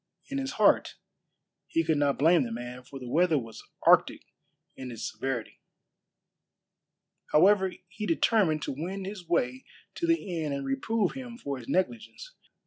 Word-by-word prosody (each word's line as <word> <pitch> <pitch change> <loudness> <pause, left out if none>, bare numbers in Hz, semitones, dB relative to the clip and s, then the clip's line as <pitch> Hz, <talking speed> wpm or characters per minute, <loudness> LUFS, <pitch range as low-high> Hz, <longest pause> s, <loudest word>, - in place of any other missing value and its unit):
In 275 - -2
his 270 +1 -3
heart - - +3 0.7
he 165 - +1
could 160 -2 +1
not 145 -1 +2
blame 165 +4 +5
the 120 -3 -3
man, 120 +2 -6
for 135 +2 -11
the 125 -2 -8
weather 165 +4 +3
was 115 -4 -6 0.2
arctic - - +5 0.5
in 130 -1 -7
its 115 - -5
severity. 130 -4 -4 1.7
However, 190 +3 +4
he 210 +3 -6
determined 165 -3 +2
to - - -3
wend 185 +6 -4
his 190 -3 -8
way 130 -6 0 0.3
to 340 - -2
the 200 - 0
inn 150 -2 -2
and 140 0 -3
reprove 185 +10 0
him 250 -3 -8
for 140 - -5
his 115 - -12
negligence. 230 - -2
165 Hz, 155 wpm, -28 LUFS, 135-200 Hz, 1.7 s, blame